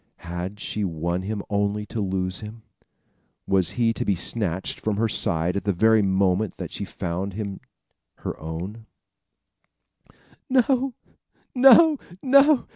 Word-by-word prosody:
Had 90 +4 -5
she 105 0 -3
won 85 0 -2
him 105 +1 -4
only 105 +1 -1
to 110 - -4
lose 95 -1 -2
him? 110 +1 -10 0.8
Was 95 -2 +2
he 115 -2 +2
to - - -3
be 100 - +1
snatched 95 0 -1
from 105 -2 -2
her 115 +1 +2
side 85 -4 0
at 100 - -2
the 100 - 0
very 110 +4 +4
moment 95 +1 +1
that - - -6
she - - -4
found 90 +3 -4
him 100 -1 -5 0.7
her - - -2
own? 90 +8 -7 1.6
"No, 260 0 +2 0.6
no, 270 +4 +7 0.2
no! 275 +1 +5
100 Hz, 135 wpm, -24 LUFS, 90-115 Hz, 1.6 s, no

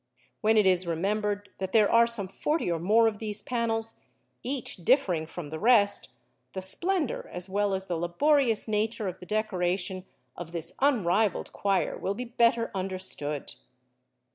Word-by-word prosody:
When 220 0 +3
it 210 - +5
is 185 -1 +3
remembered 205 +4 -1
that 190 0 -4
there 215 -2 +5
are 235 0 +5
some 225 -5 -2
forty 295 - -1
or 165 - -1
more 220 +7 +4
of 210 -2 -2
these 210 -1 -4
panels, 225 -2 -2 0.4
each 260 -1 -4
differing 180 - +1
from 160 -3 -8
the 160 - -5
rest, 210 -3 +4 0.4
the 190 - -4
splendour 340 - 0
as 180 +1 -5
well 200 0 0
as 190 0 -3
the 175 -3 -3
laborious 230 - +2
nature 215 0 -1
of 185 0 -5
the 180 - -12
decoration 185 -2 -1 0.3
of 175 -1 -8
this 170 -1 -5
unrivalled 220 -7 +1
choir 195 -2 0
will 195 - -2
be 250 - -5
better 235 -1 +2
understood. 185 -7 -3
205 Hz, 160 wpm, -28 LUFS, 180-230 Hz, 0.4 s, it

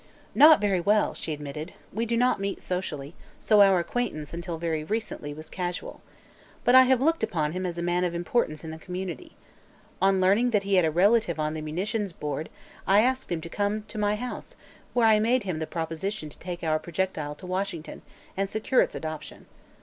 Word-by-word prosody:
"Not 305 +1 +8
very 200 -3 +1
well," 205 +4 +2
she 160 - -5
admitted. 150 +3 -6 0.2
"We 230 +4 -1
do 235 +1 0
not 250 -2 +2
meet 195 0 -3
socially, 160 -5 -4 0.2
so 210 -2 +4
our 195 -2 +6
acquaintance 170 -5 -2
until 170 0 -4
very 160 -2 -2
recently 205 -6 -3
was 155 +2 -9
casual. 180 +1 -5 0.6
But 245 - +4
I 260 0 +9
have 260 -1 +3
looked 325 +4 +2
upon 155 -3 0
him 185 +2 -3
as 175 -1 -5
a 170 - -2
man 175 +1 +1
of 175 -1 -1
importance 170 -3 -1
in 160 - -6
the 160 - -8
community. 180 -3 -6 0.7
On 195 0 +4
learning 200 +7 +4
that 200 - -2
he 200 0 -2
had 180 -3 +5
a - - +3
relative 180 0 +3
on 155 0 0
the 155 - -4
munitions 190 +6 -2
board, 150 0 -4 0.4
I 200 +2 +6
asked 260 -1 0
him 170 -2 -1
to 170 - -7
come, 205 +3 -1
to 215 - -5
my 205 0 +2
house, 245 +3 -6 0.4
where 240 -2 +4
I 220 -1 +6
made 235 +3 +2
him 180 -5 -3
the 160 - -3
proposition 165 +2 -4
to - - -15
take 175 -1 -6
our 155 -1 +1
projectile 165 -4 -3
to 165 - -12
Washington 185 -3 -4 0.3
and 195 0 -1
secure 220 +5 +2
its - - -1
adoption. 155 -1 -6
185 Hz, 205 wpm, -27 LUFS, 160-210 Hz, 0.7 s, I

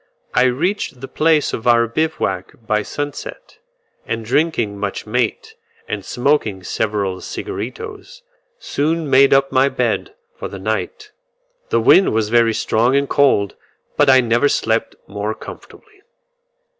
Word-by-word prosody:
I 125 - +4
reached 140 +3 -1
the 135 - -7
place 155 0 +2
of 115 - -4
our 120 -1 +5
bivouac 115 - -2
by 105 -1 +1
sunset, 145 - -7 0.4
and 115 -1 -4
drinking 120 -6 0
much 100 -1 -4
mate, 125 - -2 0.3
and - - -4
smoking 120 -7 0
several 100 -2 -2
cigaritos, 405 - -7 0.3
soon 160 - -1
made 135 0 +5
up 135 0 +3
my 130 +1 +3
bed - - -2 0.2
for - - -6
the - - -8
night. 435 -3 -4 0.6
The 445 - +2
wind 190 - +5
was 110 -1 +1
very 115 -1 +3
strong 120 +4 +1
and 140 0 +2
cold, 130 -10 +2 0.4
but 145 -2 +4
I 130 -1 +7
never 120 +4 +2
slept 115 -2 0
more 105 +2 -4
comfortably. 425 -2 -13
130 Hz, 135 wpm, -19 LUFS, 110-150 Hz, 0.6 s, I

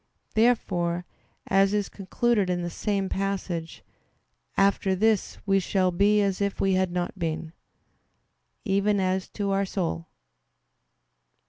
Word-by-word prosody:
Therefore, 180 -7 +1 0.4
as 195 +1 +3
is 205 -1 0
concluded 205 +1 0
in 175 -1 -1
the 175 - -3
same 200 +1 -1
passage, 190 -4 -3 0.7
"After 195 -1 +3
this 215 +1 +1
we 195 -1 +3
shall 185 -1 +1
be 205 +3 +3
as 195 -1 -1
if 200 -1 -1
we 195 -1 +2
had 185 -1 +1
not 180 +2 -3
been," 160 -1 -3 1.1
even 200 +1 +2
as 185 0 0
to 200 -2 -2
our 195 0 +2
soul. 170 - -3
195 Hz, 125 wpm, -26 LUFS, 180-200 Hz, 1.1 s, as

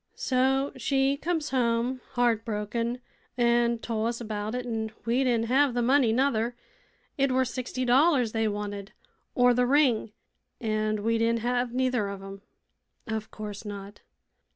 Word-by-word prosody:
"So 265 +2 +1
she 270 +1 +1
comes 315 0 -2
home, 245 0 0
heartbroken, 230 0 -1 0.4
an' 235 -1 +3
told 225 -1 -2
us 235 0 -3
about 215 -1 -4
it, 250 0 -3
an' 225 -2 -2 0.2
we 240 +3 +2
didn't 235 -3 +1
hev 260 +1 +3
th' 240 - +1
money 260 -1 +4
nuther. 240 -1 +1 0.6
It 275 -1 +3
were 260 0 +2
sixty 255 +1 -3
dollars 255 -1 +4
they 225 0 0
wanted, 205 -1 -5 0.4
or 245 0 +5
th' 245 - -1
ring; 260 -6 +3 0.5
an' 215 -2 -1
we 230 +1 +1
didn't 230 0 +1
hev 245 +1 0
neither 250 -4 0
of 195 -1 -7
'em." 195 0 -9 0.6
"Of 220 -2 -4
course 210 -1 -7
not." 205 -1 -8
235 Hz, 150 wpm, -27 LUFS, 220-255 Hz, 0.6 s, or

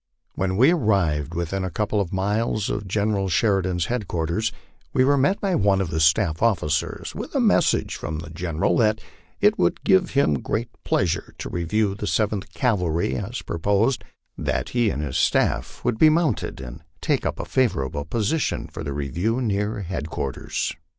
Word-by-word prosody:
When 95 0 -1
we 130 +8 +6
arrived 85 - +1
within 85 +3 -2
a 95 - -2
couple 105 +4 0
of 90 - -4
miles 105 +2 0
of 105 -1 -3
General 100 0 0
Sheridan's 90 0 +1
headquarters, 105 -2 -1 0.4
we 130 - +4
were 140 +1 +4
met 140 +9 +2
by 195 -2 0
one 100 - +3
of 95 -4 -1
his 80 -1 +1
staff 80 0 +3
officers 80 -9 0
with - - -7
a - - +3
message - - +2
from 80 +1 -4
the 80 0 -8
General, 85 0 0
that 110 -1 +3 0.4
it 210 +1 +4
would - - +1
give 190 -2 +4
him 75 - +3
great 115 - -3
pleasure 85 -3 0
to - - -6
review 95 +4 0
the 105 +1 -5
Seventh 105 -1 0
Cavalry 85 - 0
as 110 - -4
proposed, 105 +9 +1 0.3
and - - -6
that - - 0
he 120 -3 +2
and 75 -5 -2
his 65 -3 -2
staff - - +1
would 120 -2 0
be 155 - +8
mounted, 155 - 0
and 65 +3 -8 0.2
take - - 0
up - - -2
a - - -3
favorable 70 - 0
position 115 - -1
for - - -8
the 70 - -3
review 85 - -1
near 105 -2 -1
headquarters. 80 -7 -3
100 Hz, 175 wpm, -23 LUFS, 80-115 Hz, 0.4 s, be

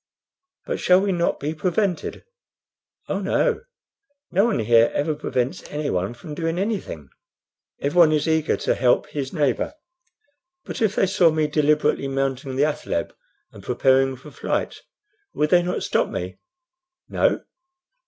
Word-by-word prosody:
"But - - -3
shall 180 0 +5
we 200 0 0
not 170 -2 0
be 150 +3 -2
prevented?" 180 +2 -1 0.8
"Oh - - -1
no. 475 -3 +1 0.7
No 195 +4 +3
one 230 -3 +1
here 115 +1 +4
ever 155 +2 0
prevents 130 -3 -2
anyone 120 -8 -2
from 150 +6 -9
doing 165 +2 -2
anything. 190 - -3 0.7
Everyone 155 +3 +4
is 155 +1 +1
eager 160 -1 +1
to - - 0
help 125 +2 +2
his 140 -3 -4
neighbor." 150 - 0 0.9
"But - - -6
if 215 -2 +2
they - - +3
saw 180 -3 +4
me 155 -1 +1
deliberately 150 -2 +1
mounting 135 -1 -2
the 140 +3 +3
athaleb 150 - -2 0.4
and 100 - -13
preparing 130 +4 +2
for 140 +4 -13
flight, - - -3 0.5
would 150 0 +1
they 175 - +6
not 175 +1 -2
stop - - +1
me?" 90 +1 -5 0.7
"No." - - +1
150 Hz, 145 wpm, -23 LUFS, 135-175 Hz, 0.9 s, they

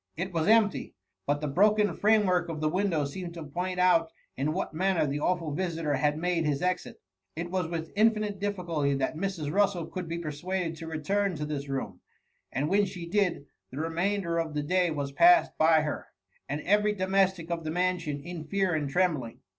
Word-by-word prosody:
It 185 +2 -3
was 165 0 0
empty— 220 -2 +3 0.3
but 145 +1 +1
the 150 - -1
broken 210 +7 +3
frame 215 0 +3
work 180 -2 +1
of 160 -2 -4
the 155 0 +1
window 175 -4 0
seemed 170 +4 -6
to 165 - -6
point 180 +5 -3
out 170 -3 +4 0.2
in 140 +4 -1
what 180 0 -3
manner 185 0 +1
the 145 0 -2
awful 165 -2 0
visitor 165 -3 -1
had 150 +2 +1
made 175 0 0
bis 145 0 0
exit. 180 0 -2 0.4
It 170 +2 -4
was 185 -3 0
with 165 -1 -4
infinite 215 -2 +2
difficulty 170 -8 -1
that 135 +2 -1
Mrs. 165 -4 -3
Russel 195 -4 +2
could 185 -2 -6
be 165 +1 -3
persuaded 170 +2 -3
to 165 0 -8
return 185 +5 -1
to 150 -1 -3
this 145 -2 -4
room; 120 -9 -4 0.5
and 140 +4 -1
when 200 +4 +3
she 180 -3 -7
did, 180 -5 0 0.2
the 130 - -10
remainder 170 +2 -1
of 160 -2 -3
the 150 - -1
day 180 +3 +2
was 145 -3 -3
passed 345 - +5
by 160 0 +5
her, 150 -1 -4 0.4
and 145 +2 -2
every 210 +3 +2
domestic 190 -3 +1
of 165 -1 -2
the 155 - -3
mansion, 170 -4 -1
in 170 -1 -7
fear 195 -2 0
and 150 -3 -1
trembling. 150 -8 0
170 Hz, 195 wpm, -28 LUFS, 155-190 Hz, 0.5 s, passed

